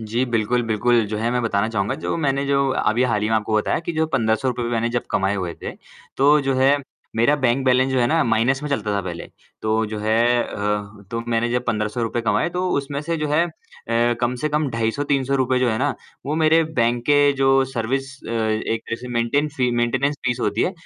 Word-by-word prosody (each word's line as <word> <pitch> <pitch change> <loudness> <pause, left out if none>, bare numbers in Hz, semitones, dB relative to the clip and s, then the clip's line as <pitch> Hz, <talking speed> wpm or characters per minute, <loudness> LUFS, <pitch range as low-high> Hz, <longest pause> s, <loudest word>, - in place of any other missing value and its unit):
जी, 115 +3 -1
बिल्कुल, 115 +2 +1
बिल्कुल 115 +1 +2
जो - - -1
है 115 +2 0
मैं 125 0 0
बताना 110 -2 0
चाहूँगा 105 +2 -1
जो - - -1
मैंने 140 0 +1
जो 140 0 +2 0.2
अभी 115 +3 +2
हाल 105 -1 0
ही 105 - 0
में 110 - +2
आपको 110 0 -1
बताया 105 - +1
कि 170 - -1
जो 160 0 +1
₹1500 115 +2 0
मैंने 115 0 0
जब - - -12
कमाए 95 +1 +1
हुए 90 -4 -3
थे, - - -4 0.4
तो 145 +2 +5
जो 135 -1 0
है 135 +2 +4 0.4
मेरा 120 +6 +4
बैंक 130 +1 +2
बैलेंस 130 +1 +3
जो 130 - +2
है 120 - +3
ना 160 +6 +2
माइनस 120 +4 +1
में 150 - -3
चलता 105 -7 -1
था 100 - 0
पहले। 85 -2 -6 0.4
तो 110 - -1 0.2
जो 105 0 -5
है 110 +1 +1 0.3
अ, 105 0 -4
तो 115 - -2
मैंने 115 0 +1
जब 125 +1 -1
₹1500 110 +2 -1
कमाए 110 +6 +1
तो 185 +1 0
उसमें 140 0 -5
से 165 +2 -2
जो 155 -1 -2
है 150 +3 +3
अ, - - -9 0.7
कम 120 0 0
से 155 - +1
कम 150 -1 0
₹250-₹300 130 +2 0
जो 125 -1 +2
है 110 - -1
ना, 140 +2 0 0.3
वो 145 - -1
मेरे 160 +1 +5
बैंक 120 -6 0
के 145 -1 +5
जो 135 - +4 0.2
सर्विस 135 +1 -3
अ, - - -6
एक 110 0 -1
जैसे 120 +2 -4
मेंटेन 120 +5 0
फी 125 -2 +1
मेंटेनेंस 130 +4 +1
फीस 125 0 0
होती - - 0
है 185 - 0
120 Hz, 220 wpm, -21 LUFS, 110-140 Hz, 0.7 s, तो